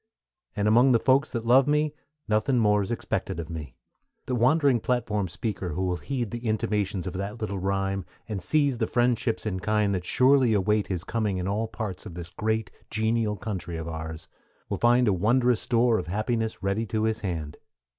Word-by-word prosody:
And 105 -1 0
among 120 +4 +5
the 115 - +4
folks 135 +4 +3
that 115 -2 -3
love 130 +3 +5
me 150 0 +2 0.3
Nothin' 110 +5 +2
more's 105 -3 +2
expected 115 -7 -3
of 85 0 -6
me. 75 -6 -7 0.5
The 130 - -3
wandering 130 +1 +3
platform 110 -5 -1
speaker 90 0 -4
who 95 - -2
will 90 -1 0
heed 120 -1 -3
the 120 0 -5
intimations 105 -3 -1
of 90 - -4
that 100 +4 -4
little 100 -3 -3
rime, 95 0 -1 0.2
and 105 -4 -4
seize 140 - +2
the 110 - +1
friendships 120 -1 +1
in 95 -3 -2
kind 105 +1 +1
that 90 -2 -2
surely 130 +3 +4
await 105 +1 +1
his 90 -3 -3
coming 105 -3 -1
in 90 0 -2
all 105 +3 -1
parts 110 -3 -6
of 85 - -9
this 85 -1 -7
great, 110 -1 -1 0.2
genial 110 -1 0
country 90 -5 -5
of 80 0 -5
ours, 80 0 -6 0.4
will - - -2
find 120 +1 +4
a 105 - +4
wondrous 120 +5 +2
store 120 -1 +2
of 90 - -6
happiness 110 +3 -2
ready 100 +4 0
to 110 +1 -1
his 110 0 0
hand. 80 -7 -4
110 Hz, 190 wpm, -26 LUFS, 95-120 Hz, 0.5 s, among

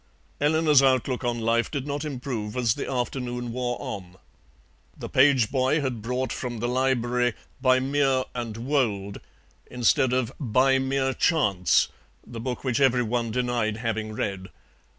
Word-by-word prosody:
Eleanor's 150 -1 +4
outlook 130 -1 +1
on 120 -1 0
life 115 +1 +1
did 140 -3 -4
not 145 0 -3
improve 125 -6 -4
as 120 -3 +2
the - - -5
afternoon 125 -1 -3
wore 125 0 -2
on. 95 -9 -7 0.8
The - - -6
page 130 -4 +4
boy 130 +3 +2
had 130 -5 -3
brought 125 +2 -2
from 120 -2 -4
the 120 +2 -2
library 125 -2 +1 0.3
BY 130 -1 +4
MERE 135 -1 +1
AND 115 -3 -5
WOLD 115 -6 -1 0.5
instead 125 +1 +2
of 125 -2 0
BY 135 +1 +3
MERE 135 0 0
CHANCE, 100 - +2 0.4
the 115 - -8
book 125 +2 -4
which 130 -1 0
every 125 -2 +4
one 115 0 -1
denied 120 -2 -1
having 110 -2 -3
read. 95 -3 -3
125 Hz, 150 wpm, -25 LUFS, 115-135 Hz, 0.8 s, Eleanor's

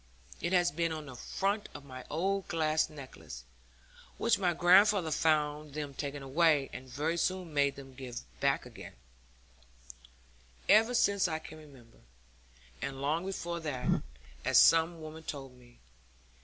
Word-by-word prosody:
It 170 - -1
has 175 -4 +3
been 165 +2 -1
on 155 -1 -5
the 130 -3 -10
front 200 - -2
of 140 - -9
my 130 -2 -9
old 190 +5 -1
glass 155 -1 +1
necklace 130 - -10 0.7
(which - - +2
my 180 -3 +2
grandfather 180 0 +5
found 150 -1 +1
them 145 -2 -4
taking 140 0 -5
away, 145 0 +2
and 130 0 -8
very 150 +7 -1
soon 180 -1 -1
made 140 -1 +2
them 135 -1 -11
give 125 -2 -7 0.2
back - - +1
again) - - -11 1.7
ever 225 +3 +5
since 200 -4 +3
I 160 -2 -2
can 155 0 -11
remember; 135 -7 -17 0.8
and 135 -1 -4
long 155 +6 -1
before 175 -3 -3
that, 145 -6 -1 0.4
as - - +5
some 165 +1 +5
woman 155 +1 -8
told 135 -5 -7
me. 120 -1 -19
155 Hz, 145 wpm, -31 LUFS, 140-170 Hz, 1.7 s, grandfather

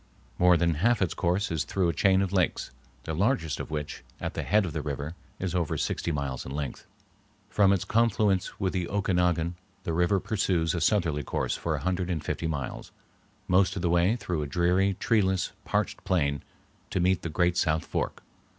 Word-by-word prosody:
More 90 -1 +6
than 85 0 +2
half 120 +2 +3
its 95 - 0
course 90 +3 0
is 80 -2 0
through 95 0 0
a - - 0
chain 95 +4 +3
of 95 - -3
lakes, 90 -3 0 0.3
the 80 - -4
largest 95 - 0
of - - -5
which 75 -1 -5 0.2
at - - -4
the - - -2
head 105 -1 +2
of 85 - -5
the 80 - -2
river 75 +1 -4 0.2
is 95 -2 -3
over 85 -4 0
sixty 85 - -1
miles 70 -4 -3
in - - -8
length. 70 0 -5 0.6
From 100 -2 +4
its 100 -3 +1
confluence 105 -4 +1
with 95 -2 0
the 90 -3 -1
Okinagan 90 -4 +1 0.3
the 85 - -2
river 90 +4 +2
pursues 90 -6 0
a 85 - -2
southerly 80 -5 +2
course - - -2
for - - -2
a - - -4
hundred 90 0 -1
and 80 -4 -2
fifty 85 - -2
miles, 70 -5 -4 0.6
most 90 +1 +3
of 95 - -4
the 85 - +2
way 85 +6 +3
through 90 -9 -3
a 75 - -3
dreary, 90 +5 +2
treeless, 95 -5 +1
parched - - -1
plain 70 -7 +1 0.5
to - - -1
meet 90 0 +2
the 85 - -4
great 85 +3 +1
south 80 -2 +1
fork. - - -3
90 Hz, 195 wpm, -28 LUFS, 80-95 Hz, 0.6 s, More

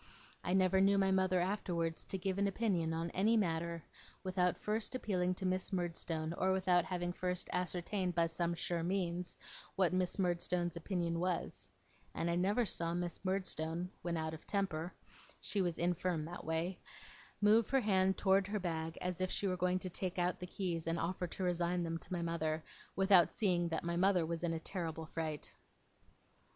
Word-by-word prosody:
I 180 - 0
never 190 0 +4
knew 200 +1 +5
my 195 -1 +3
mother 190 -1 +3
afterwards 175 -3 -1
to 195 - -2
give 190 +1 -1
an 200 - +3
opinion 190 -5 0
on 165 +1 -2
any 220 +5 +3
matter, 170 -4 0 0.4
without 185 -1 +1
first 215 +4 -2
appealing 185 -6 0
to 190 - -4
Miss 185 +1 0
Murdstone, 165 -3 -2
or 190 - +3
without 185 -2 +3
having 175 -1 -2
first 180 0 -2
ascertained 180 +1 -1
by 170 -1 +4
some 170 +1 -1
sure 170 0 -1
means, 175 0 -1 0.4
what 185 -2 +3
Miss 185 -1 0
Murdstone's 175 -2 0
opinion 170 -1 -1
was; 165 - -2 0.5
and 170 - 0
I - - +1
never 200 +7 +2
saw 170 -3 -1
Miss 175 0 -3
Murdstone, 180 -2 -1
when 170 -1 -1
out 160 0 -2
of 160 - -10
temper 180 -4 -1 0.5
(she 200 - -1
was 175 -3 0
infirm 175 -2 0
that 175 +2 -7
way), 160 +3 -1 0.6
move 210 +1 +5
her 270 0 +3
hand 190 -3 +3
towards 195 0 +3
her 210 0 0
bag 165 -3 -3
as 180 0 -2
if 185 - +1
she 205 - -2
were 185 -2 +1
going 180 +1 +1
to 185 0 -3
take 185 +1 -3
out 180 0 +1
the 180 - -5
keys 175 -4 -3
and 165 +1 +1
offer 180 +1 -1
to 185 - -5
resign 175 0 +1
them 165 0 -2
to - - -13
my 175 -2 -1
mother, 160 -2 -1 0.3
without 190 -4 +6
seeing 175 -5 +2
that 160 - -2
my 170 0 -1
mother 185 -2 +4
was 165 +1 -3
in 170 - +1
a 165 - -2
terrible 165 -2 -3
fright. 155 -2 -4
180 Hz, 185 wpm, -36 LUFS, 170-190 Hz, 0.6 s, without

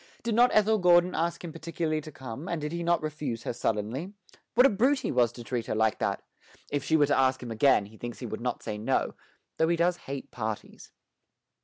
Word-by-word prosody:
Did 230 - -1
not 240 +3 +6
Ethel 215 0 +4
Gordon 175 0 +5
ask 170 +1 -1
him 165 -3 -6
particularly 160 -1 -2
to 155 - -10
come, 130 +5 -7
and 170 - -1
did 150 0 -4
he 170 0 -3
not 170 -1 +1
refuse 150 -7 -4
her - - -3
sullenly? 115 - -2 0.4
What 250 +3 +7
a - - +7
brute 260 +7 +2
he - - -2
was 120 -3 +3
to 120 - -9
treat 120 -1 -3
her - - -1
like 110 -1 +2
that! - - -1 0.5
If 145 -1 -1
she 160 +3 +3
were 145 - +5
to 145 - +2
ask 130 -1 +2
him 120 - -6
again, 115 -2 +4
he 110 +2 -15
thinks 120 +1 -6
he 125 - -7
would 110 0 -5
not 125 0 -3
say 105 -2 -4
no, 130 +5 0 0.4
though 160 - +3
he 170 0 +2
does 175 +1 +2
hate 135 -3 -7
parties. 110 -2 -6
145 Hz, 230 wpm, -28 LUFS, 120-170 Hz, 0.5 s, What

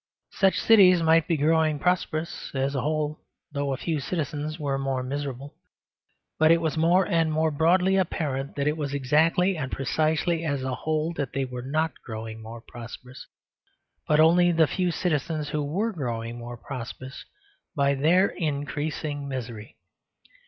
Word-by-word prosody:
Such 195 -1 +2
cities 185 -6 +6
might 160 0 +4
be 165 - +1
growing 155 +1 +2
prosperous 170 0 -1
as 135 +1 0
a 135 - -1
whole, 155 +1 -1 0.3
though 140 -1 -2
a 135 - -1
few 160 +2 -2
citizens 150 0 -3
were 140 -2 -1
more 135 -2 -1
miserable. 140 0 -5 0.9
But 155 0 +5
it 165 0 +6
was 160 -1 -1
more 170 +4 +3
and 165 -4 +1
more 160 +1 +1
broadly 180 +5 +3
apparent 140 -7 -2
that 140 0 -1
it 150 +1 0
was 145 -2 -3
exactly 160 +7 +2
and 135 -5 -4
precisely 160 +4 0
as 140 -4 -1
a 130 -1 -2
whole 155 +5 -1
that 140 -4 -3
they 135 0 -1
were 125 -1 -6
not 155 +5 -2
growing 110 -1 -7
more 115 +1 -9
prosperous, 120 +2 -11 0.8
but 150 0 +3
only 175 +2 +5
the 165 -1 +4
few 180 +4 -1
citizens 155 -2 -1
who 150 - -1
were 195 +11 -1
growing 120 -7 -4
more 120 0 -7
prosperous 130 +1 -8 0.5
by 140 -1 +2
their 165 +7 +4
increasing 145 -1 -3
misery. 120 -5 -6
150 Hz, 160 wpm, -26 LUFS, 135-165 Hz, 0.9 s, cities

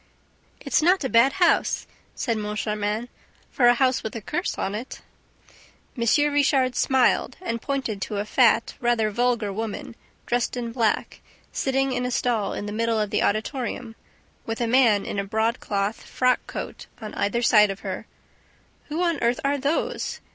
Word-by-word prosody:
"It's - - +1
not 360 +2 +3
a 265 - -1
bad 240 +4 +5
house," 355 -3 +2 0.3
said 230 -3 -1
Moncharmin, 210 +1 -2 0.4
"for 245 - +3
'a 240 - +6
house 255 0 +2
with 220 - -6
a - - -3
curse - - -3
on 195 - -2
it.'" 225 +5 -6 0.9
M. 290 +5 +2
Richard 270 -3 +2
smiled 260 -2 +2
and 230 -11 -4
pointed 255 -8 -3
to 210 - -3
a 205 - -1
fat, 235 +1 +3
rather 235 -3 +1
vulgar 235 -2 0
woman, 225 +4 -5 0.3
dressed 245 +1 -1
in 235 -1 -3
black, 230 -3 -1 0.3
sitting 270 0 0
in 250 -1 -1
a 250 - -1
stall 235 -4 0
in - - -4
the 205 - -5
middle 230 0 0
of 210 -1 -1
the - - +1
auditorium 230 +2 -2 0.5
with 225 0 -4
a 240 - +1
man 230 -4 +4
in 200 - -3
a - - 0
broadcloth 215 -1 -1
frock 250 -1 +1
coat - - -7
on 215 -2 -7
either 205 +4 -1
side 210 -3 +6
of 195 0 -5
her. 190 -2 -5 0.8
"Who 315 +4 -2
on 335 -4 0
earth 235 +1 +1
are 285 +1 +1
'those?'" 285 +4 -1
235 Hz, 170 wpm, -24 LUFS, 215-260 Hz, 0.9 s, a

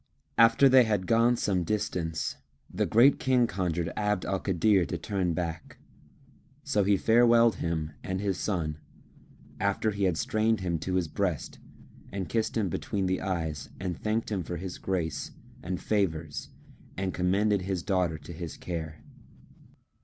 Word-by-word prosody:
After 115 +4 +6
they 130 -1 +7
had 105 -4 0
gone 115 +4 +4
some 95 -6 0
distance, 90 -5 -2 0.4
the - - 0
Great 125 +5 +5
King 130 -2 +3
conjured 90 -6 -2
Abd 105 -3 0
al 95 0 -1
Kadir 95 +1 +2
to 90 - -3
turn 90 +1 -1
back; 80 -2 -4 0.9
so 105 - +1
he 100 0 +3
farewelled 115 +1 +5
him 80 -2 -2
and 95 0 -3
his 100 -2 -1
son, 80 -7 -2 0.8
after 100 +2 +1
he 100 -1 -1
had 90 -4 +1
strained 110 +2 +1
him 85 -3 -1
to 95 +3 -2
his 90 -3 +1
breast 90 -1 -2 0.5
and 95 -1 -4
kissed 115 0 -1
him 105 -3 +1
between 100 +2 -2
the 95 0 0
eyes 80 -7 -3
and 90 -2 -3
thanked 110 +5 -2
him 100 -3 0
for 85 +1 -5
his 90 +1 -6
grace 85 -6 -2 0.3
and 90 0 -3
favours 80 -8 -1 0.5
and 95 -1 -2
commended 100 +3 +2
his 90 -2 -3
daughter 90 -5 0
to 75 +3 -10
his 85 -1 -7
care. 80 -3 -6
95 Hz, 155 wpm, -28 LUFS, 85-105 Hz, 0.9 s, they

